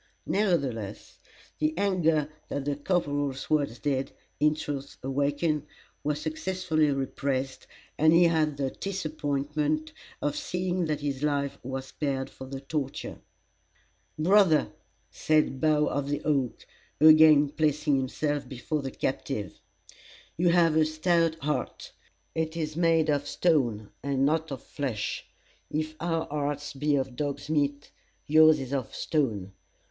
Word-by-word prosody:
Nevertheless, 135 - -1 0.4
the 155 +1 0
anger 165 -6 +2 0.2
that 140 -1 -3
the 145 -1 0
corporal's 145 -4 -1
words 145 -6 +1
did, 135 -1 -1 0.3
in 150 0 +4
truth, 140 -2 -5
awaken, 145 +3 0 0.4
was 150 0 -1
successfully 160 0 0
repressed, 135 -1 -2 0.3
and 155 +1 +6
he 170 +2 +6
had 155 -4 +2
the 135 -2 -1
disappointment 155 -4 -2 0.3
of 145 -1 -1
seeing 180 0 -1
that 150 -2 -2
his 140 -2 -2
life 140 -2 -1
was 130 +1 -5
spared 135 -1 -3
for 130 - -10
the 135 0 -6
torture. 140 -1 -4 1.0
"Brother," 175 -1 +4 0.4
said 155 -4 +1
Bough 150 -1 +3
of 140 -1 -2
the 145 - -2
Oak, 135 -5 0 0.3
again 155 -1 +7
placing 150 0 +1
himself 145 +2 -2
before 145 +3 -3
the 135 - -4
captive, 125 - -3 0.8
"you 175 +1 +2
have 170 -2 +4
a 160 - +5
stout 165 +1 +1
heart. 150 -2 -3 0.4
It 160 0 -2
is 155 -2 -3
made 165 -2 +3
of 145 0 0
stone, 120 - +1
and 135 -1 +1
not 160 +1 0
of 135 - -6
flesh. 130 -8 -3 0.4
If 155 +1 -2
our 165 -1 -1
hearts 145 0 -3
be 145 +1 +1
of 130 -2 -2
dog's 145 +2 -3
meat, 145 -1 0 0.3
yours 155 +1 +6
is 135 0 -5
of 130 -4 -3
stone. 110 - -1
150 Hz, 130 wpm, -28 LUFS, 140-155 Hz, 1.0 s, again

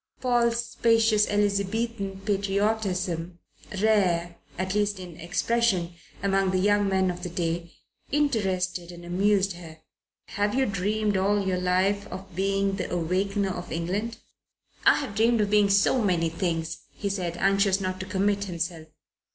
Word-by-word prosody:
Paul's 235 -2 +1
spacious 225 -2 +3
Elizabethan 200 0 -1
patriotism, 195 -4 -1 0.5
rare 175 -6 +2 0.2
at 185 +1 -2
least 205 -1 0
in 180 -3 -9
expression 185 0 0 0.3
among 195 -1 +2
the 185 - +1
young 205 +1 +3
men 190 -1 +2
of 175 0 -8
the 180 - -4
day, 170 0 -2 0.4
interested 190 - 0
and 175 0 -11
amused 195 +2 +2
her. 165 -2 -11 0.5
"Have 205 +2 -1
you 265 0 +3
dreamed 205 +1 0
all 200 +1 +1
your 185 -1 0
life 190 +3 +1
of 190 -2 -9
being 195 +1 0
the 180 - -4
Awakener 190 +4 0
of 175 -1 -6
England?" 200 +8 -2 0.7
"I - - +8
have 270 -8 -4
dreamed 225 +2 +3
of 205 -1 0
being 210 -1 +4
so 200 +6 +3
many 175 -5 +1
things," 165 -1 -2
he 205 - -5
said, 180 -4 -2
anxious 195 0 +3
not 185 -1 -3
to 190 - -5
commit 200 +1 0
himself. 170 -3 -4
195 Hz, 145 wpm, -26 LUFS, 180-205 Hz, 0.7 s, I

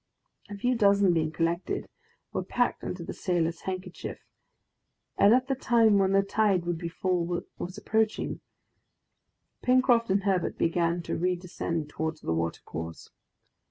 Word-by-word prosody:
A 205 - -6
few 245 +5 +1
dozen 200 -4 +4
being 160 -2 +1
collected, 170 +2 -1 0.5
were - - 0
packed - - 0
in - - -3
the - - -6
sailor's 170 -3 -1
handkerchief, 185 -1 -5 1.0
and 205 - +5
as 255 +2 +5
the 270 - 0
time 230 -5 +4
when 195 0 +2
the 195 0 +4
tide 195 -3 +1
would 175 -1 -2
be 170 - -4
full 175 -1 -1 0.2
was 180 +3 -5
approaching, 220 +1 0 1.2
Pencroft 250 -2 +3
and 195 +1 +2
Herbert 190 -3 0
began 170 +1 +1
to - - -3
redescend 175 -3 -2
towards 160 +1 -3
the 80 - -1
watercourse. 80 0 -4
185 Hz, 140 wpm, -28 LUFS, 170-205 Hz, 1.2 s, and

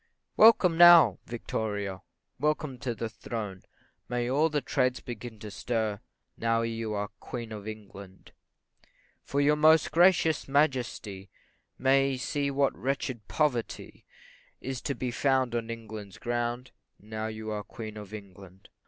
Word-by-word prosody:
Welcome 185 -7 +6
now, 175 -2 +8
VICTORIA! 105 -4 -3 0.4
Welcome 150 -2 -1
to 120 -2 -3
the 115 - -3
throne! 105 -3 -6 0.5
May 120 -1 -1
all 145 +6 +2
the 150 -1 0
trades 130 -3 0
begin 120 -1 -8
to 105 - -7
stir, 110 -2 -2 0.4
Now 115 0 +1
you 115 -1 -3
are 105 0 -2
Queen 115 -2 -7
of 105 -1 -7
England; 100 -3 -10 0.9
For 140 - -2
your 145 +1 +4
most 155 +1 +5
gracious 165 -2 +4
Majesty 125 -9 0 0.5
May 135 +1 +3
see 140 +2 -1
what 140 0 +1
wretched 130 -4 -3
poverty 135 -7 -2 0.6
Is 130 -1 -5
to 140 - -2
be 125 +1 -3
found 130 -1 +1
on 115 -1 -2
England's 110 -3 -8
ground, 120 +1 -3 0.3
Now 110 +1 -5
you 110 0 -6
are 105 -1 -3
Queen 110 0 -8
of 105 -2 -9
England. 95 -2 -12
120 Hz, 135 wpm, -28 LUFS, 110-140 Hz, 0.9 s, now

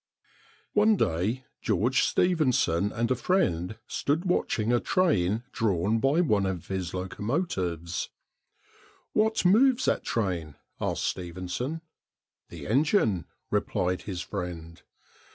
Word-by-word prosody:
One 215 +1 +5
day 105 - 0 0.2
George 110 +4 +2
Stephenson 130 - +2
and 115 +2 -1
a - - +4
friend 110 - 0
stood 155 +6 -1
watching 120 -10 +1
a 120 - +4
train 115 - +1
drawn 105 +1 +1
by 140 +7 +3
one 105 - +2
of 90 -3 -4
his 95 -2 -3
locomotives. 95 - -2 1.0
"What 220 -2 +2
moves 255 +7 +5
that - - +1
train?" 90 -9 -2 0.2
asked - - -1
Stephenson. 90 - -3 0.7
"The - - -9
engine," 115 - +2 0.3
replied 90 0 0
his 95 -4 -5
friend. 85 -4 -6
105 Hz, 110 wpm, -28 LUFS, -, 1.0 s, One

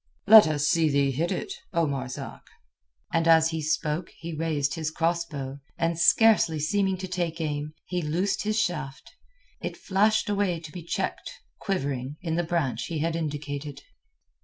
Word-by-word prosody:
"Let 215 -3 +9
us 150 -2 0
see 165 -2 +3
thee 140 -1 +2
hit 160 +6 -1
it, 390 - -3 0.2
O 170 -1 +2
Marzak." 135 -3 -5 0.7
And 165 0 +2
as 160 0 +5
he 160 0 -3
spoke 155 +2 -1
he 165 0 -6
raised 150 -3 -1
his 160 0 -2
cross 170 +1 0
bow, 140 -3 -6 0.2
and 165 0 0
scarcely 190 -5 +5
seeming 190 +4 +1
to 185 +1 -5
take 175 -2 -3
aim, 150 -1 -3
he 180 -1 -2
loosed 180 +6 -1
his 215 +1 0
shaft. 150 -8 -3 0.5
It - - -5
flashed 215 +3 +2
away 200 -4 0
to 160 -2 -10
be 175 - -7
checked, 170 - -3 0.3
quivering, 140 - -3
in 165 -2 -3
the 170 - +1
branch 155 -9 -1
he 165 - -4
had 165 +2 -1
indicated. 145 -2 -4
165 Hz, 165 wpm, -26 LUFS, 150-175 Hz, 0.7 s, Let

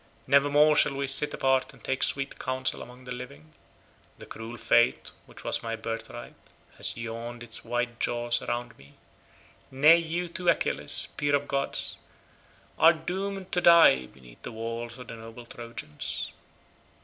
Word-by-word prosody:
Nevermore 145 +2 +4
shall 150 -1 +4
we 140 0 -2
sit 140 +2 +3
apart 130 -1 +1
and - - -19
take 130 0 -2
sweet 135 0 0
counsel 130 -1 -1
among 125 +1 -12
the 125 - -8
living; 80 - -9 0.6
the - - -11
cruel 115 +2 -8
fate 120 +1 +2 0.2
which - - -12
was - - 0
my 115 0 -3
birth 115 0 -5
right 120 - -9 0.4
has - - +1
yawned 115 +1 -6
its 115 -1 -7
wide 120 0 -3
jaws 120 0 0
around 120 0 -4
me—nay, 135 - 0
you 170 +1 -3
too 175 +1 -1
Achilles, 170 - +2
peer 145 0 +2
of 145 0 -2
gods, 140 0 -1 0.8
are 165 +1 +7
doomed 190 +4 -5
to 180 - +2
die 165 - +6
beneath 60 -2 -18
the - - -7
wall 115 +1 -5
of 120 - -11
the - - -8
noble 115 +1 -11
Trojans. 115 -11 -5
125 Hz, 155 wpm, -27 LUFS, 115-145 Hz, 0.8 s, are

